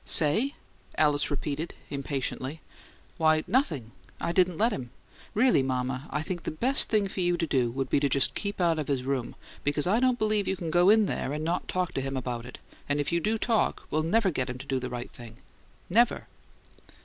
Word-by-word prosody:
"'Say?'" 215 Hz, -, +2 dB, 0.4 s
Alice 150 Hz, -2 st, +3 dB
repeated, 150 Hz, +3 st, -3 dB, 0.2 s
impatiently. 140 Hz, +1 st, -3 dB, 0.6 s
"Why, 155 Hz, -1 st, +3 dB
nothing. 150 Hz, -, 0 dB, 0.3 s
I -, -, -1 dB
didn't 180 Hz, -1 st, +2 dB
let 230 Hz, +3 st, +3 dB
him. 125 Hz, -7 st, -5 dB, 0.5 s
Really, 235 Hz, -, +4 dB
mama, 130 Hz, +1 st, -2 dB
I 150 Hz, -, -2 dB
think 175 Hz, +1 st, -4 dB
the -, -, -4 dB
best 250 Hz, -, +3 dB
thing 210 Hz, -3 st, +2 dB
for 190 Hz, -, -6 dB
you 175 Hz, 0 st, +2 dB
to 170 Hz, -, 0 dB
do 130 Hz, -6 st, +1 dB
would 135 Hz, +2 st, -3 dB
be 140 Hz, -, +2 dB
to 140 Hz, 0 st, +1 dB
just 135 Hz, +1 st, +3 dB
keep 200 Hz, -1 st, -4 dB
out 170 Hz, -3 st, +2 dB
of 150 Hz, -, -3 dB
his 135 Hz, -3 st, -1 dB
room, 130 Hz, -3 st, -2 dB, 0.3 s
because 145 Hz, 0 st, +1 dB
I 205 Hz, +6 st, +3 dB
don't 255 Hz, -1 st, +2 dB
believe 215 Hz, -3 st, +1 dB
you 190 Hz, -, +1 dB
can 170 Hz, -3 st, -4 dB
go 175 Hz, +3 st, +5 dB
in 215 Hz, 0 st, +6 dB
there 145 Hz, -, -2 dB
and 150 Hz, +1 st, -3 dB
not 175 Hz, +2 st, -1 dB
talk 180 Hz, -2 st, -1 dB
to 135 Hz, -, -1 dB
him 135 Hz, 0 st, -3 dB
about 125 Hz, -2 st, -4 dB
it, 125 Hz, -, -9 dB, 0.3 s
and 145 Hz, 0 st, +1 dB
if 145 Hz, -, -1 dB
you 170 Hz, -, +2 dB
do 215 Hz, +6 st, 0 dB
talk 225 Hz, 0 st, 0 dB
we'll 155 Hz, -, +1 dB
never 195 Hz, +4 st, +2 dB
get 130 Hz, -4 st, -2 dB
him 125 Hz, -, -4 dB
to 130 Hz, -, -9 dB
do 135 Hz, -1 st, -1 dB
the 125 Hz, 0 st, -4 dB
right 120 Hz, 0 st, -6 dB
thing. 115 Hz, -2 st, -12 dB, 0.5 s
Never!" 230 Hz, +6 st, +2 dB
155 Hz, 215 wpm, -28 LUFS, 135-190 Hz, 0.6 s, in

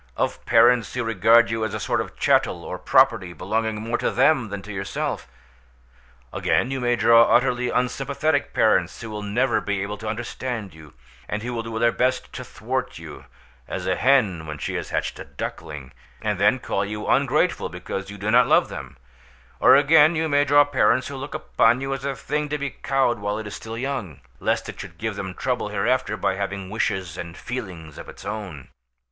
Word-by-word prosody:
of -, -, -1 dB
parents 120 Hz, -1 st, +4 dB
who 125 Hz, -, -1 dB
regard 115 Hz, +2 st, +4 dB
you 115 Hz, -1 st, -1 dB
as 110 Hz, -, -2 dB
a -, -, -3 dB
sort -, -, 0 dB
of -, -, -8 dB
chattel -, -, +2 dB
or -, -, -5 dB
property, 90 Hz, -2 st, +3 dB
belonging 110 Hz, +6 st, -2 dB
more 115 Hz, +2 st, -2 dB
to -, -, +1 dB
them 130 Hz, -7 st, +3 dB
than 100 Hz, 0 st, -4 dB
to 105 Hz, -, -8 dB
yourself! 95 Hz, 0 st, -3 dB, 1.1 s
Again, 125 Hz, -, +1 dB
you 135 Hz, -, -2 dB
may 120 Hz, -1 st, +1 dB
draw 115 Hz, 0 st, +6 dB
utterly 125 Hz, 0 st, +2 dB
unsympathetic 140 Hz, +4 st, 0 dB
parents, -, -, +2 dB
who 115 Hz, -, -7 dB
will 105 Hz, 0 st, -5 dB
never 115 Hz, +4 st, +1 dB
be 100 Hz, -1 st, -2 dB
able 105 Hz, +1 st, -5 dB
to 110 Hz, -, -7 dB
understand 115 Hz, -1 st, -4 dB
you, 80 Hz, -2 st, -15 dB, 0.3 s
and 105 Hz, +1 st, -3 dB
who 125 Hz, +1 st, -4 dB
will 115 Hz, -, -2 dB
do 115 Hz, 0 st, -6 dB
their 115 Hz, +1 st, +3 dB
best 125 Hz, +1 st, -1 dB
to -, -, -6 dB
thwart -, -, -4 dB
you -, -, -10 dB, 0.4 s
(as -, -, -4 dB
a -, -, +1 dB
hen 105 Hz, -11 st, +2 dB
when 75 Hz, 0 st, -5 dB
she -, -, -4 dB
has -, -, -4 dB
hatched -, -, -2 dB
a -, -, -5 dB
duckling), 75 Hz, -4 st, -7 dB, 0.3 s
and 105 Hz, -3 st, -1 dB
then 105 Hz, +5 st, +4 dB
call 100 Hz, -5 st, -2 dB
you 105 Hz, +1 st, -5 dB
ungrateful -, -, +1 dB
because 95 Hz, 0 st, -6 dB
you 100 Hz, -, -8 dB
do 105 Hz, +2 st, -2 dB
not 125 Hz, +2 st, +5 dB
love -, -, +4 dB
them; 70 Hz, 0 st, -8 dB, 0.6 s
or, -, -, +7 dB
again, 150 Hz, +3 st, +6 dB
you 160 Hz, 0 st, 0 dB
may 145 Hz, -1 st, +3 dB
draw 145 Hz, +1 st, +6 dB
parents 130 Hz, -3 st, +2 dB
who 140 Hz, -, -6 dB
look 135 Hz, +3 st, -6 dB
upon 125 Hz, -5 st, +2 dB
you 135 Hz, 0 st, -3 dB
as 135 Hz, -1 st, -5 dB
a 140 Hz, -1 st, -2 dB
thing 150 Hz, +2 st, -3 dB
to 150 Hz, -, -1 dB
be 140 Hz, -1 st, -3 dB
cowed 135 Hz, -4 st, 0 dB
while 100 Hz, +1 st, -2 dB
it 110 Hz, -, -5 dB
is 105 Hz, -, -6 dB
still 115 Hz, 0 st, -7 dB
young, 120 Hz, -, -4 dB, 0.2 s
lest -, -, 0 dB
it -, -, -8 dB
should 85 Hz, -, -9 dB
give 110 Hz, +1 st, -3 dB
them 95 Hz, -2 st, -5 dB
trouble 125 Hz, -4 st, -1 dB
hereafter 110 Hz, +2 st, 0 dB
by 95 Hz, -, 0 dB
having 100 Hz, -1 st, -4 dB
wishes 95 Hz, -5 st, -2 dB
and 85 Hz, 0 st, -7 dB
feelings 90 Hz, -, -7 dB
of -, -, -9 dB
its -, -, -12 dB
own. 95 Hz, -11 st, -6 dB
115 Hz, 205 wpm, -23 LUFS, 100-130 Hz, 1.1 s, or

